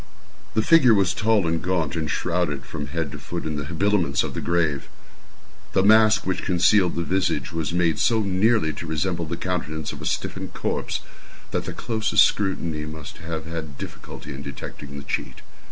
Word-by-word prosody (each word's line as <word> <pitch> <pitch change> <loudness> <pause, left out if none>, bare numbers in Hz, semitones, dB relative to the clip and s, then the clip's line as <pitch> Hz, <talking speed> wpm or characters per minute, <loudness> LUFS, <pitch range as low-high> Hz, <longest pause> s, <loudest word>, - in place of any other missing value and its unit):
The 110 - +3
figure 130 -6 +6
was 95 -2 +3
tall 110 -3 +2
and 80 -1 0
gaunt, 85 -4 0
and 80 -2 -2
shrouded 85 -6 -1
from 75 -1 -5
head 80 0 -3
to - - -7
foot 85 -2 -5
in 80 -1 -2
the 75 -1 -3
habiliments 85 -2 +1
of - - -4
the - - -3
grave. 80 -5 0 0.8
The 95 - +3
mask 110 +1 +6
which 95 0 -1
concealed 90 0 +3
the 85 - -1
visage 85 -7 0
was 80 0 -2
made 85 -2 +1
so 115 -2 +3
nearly 100 -3 +2
to 85 - -7
resemble 85 +2 -1
the 85 +2 -4
countenance 80 -4 -3
of - - -9
a - - -3
stiffened - - -3
corpse - - -2 0.5
that - - -1
the - - -4
closest 110 -2 +3
scrutiny 85 -6 0
must 75 -3 -8
have 80 -1 -5
had 80 -4 -6
difficulty 75 - -8
in 70 - -7
detecting 70 0 -8
the 70 - -6
cheat. - - -4
85 Hz, 185 wpm, -24 LUFS, 75-95 Hz, 0.8 s, figure